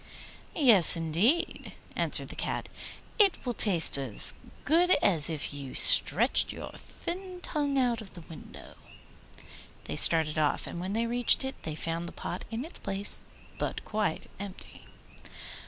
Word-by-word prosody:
'Yes, 225 - +7
indeed,' 175 - -2 0.2
answered - - 0
the - - -10
Cat; - - -6 0.5
'it 400 -4 +3
will 245 - -4
taste 180 -10 +4
as 130 -7 +3 0.3
good 335 +4 +1
to 370 - +2
you - - 0
as 165 -5 +3
if 155 -2 -5
you 140 -2 -10
stretched - - +5
your - - -10
thin 365 +1 -10
tongue 285 -2 -4
out 245 -3 -2
of 195 -4 -15
the 175 - -12
window.' 160 0 -16 1.1
They - - -8
started 160 -2 +4
off, 150 -2 -2
and 170 - -8
when 185 +3 -7
they 230 +2 -3
reached 240 +2 +1
it 265 - -6
they 155 - -8
found 165 +2 -6
the - - -12
pot 180 - -9
in 230 +5 -7
its 330 - -10
place, 195 +1 -5 0.4
but - - -6
quite 210 -6 -4
empty! 200 -1 -12
200 Hz, 155 wpm, -26 LUFS, 165-265 Hz, 1.1 s, Yes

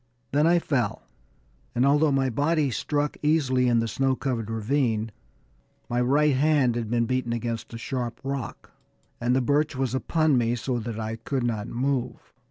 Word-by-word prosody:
Then 150 +3 +3
I 175 +1 +5
fell, 130 -10 -1 0.7
and 120 +2 +3
although 145 +2 +4
my 135 -1 +1
body 145 +2 +1
struck 145 +6 -1
easily 135 -5 +2
in 120 -1 +3
the 115 - -1
snow 135 +3 +1
covered 120 -5 -3
ravine, 115 -1 0 0.8
my 120 +1 +1
right 145 +3 +3
hand 140 -3 +3
had 115 -3 -3
been 120 0 +1
beaten 125 -1 -1
against 115 -1 -4
a - - -4
sharp 120 0 -4
rock, 135 -5 -5 0.5
and 120 +1 +1
the 130 - +3
birch 145 +3 +1
was 130 -1 -1
upon 155 +1 +2
me 120 0 +1
so 125 +1 -2
that 115 -1 -5
I 110 0 -3
could 130 +3 -2
not 110 -3 -2
move. 125 0 -3
130 Hz, 175 wpm, -26 LUFS, 115-140 Hz, 0.8 s, I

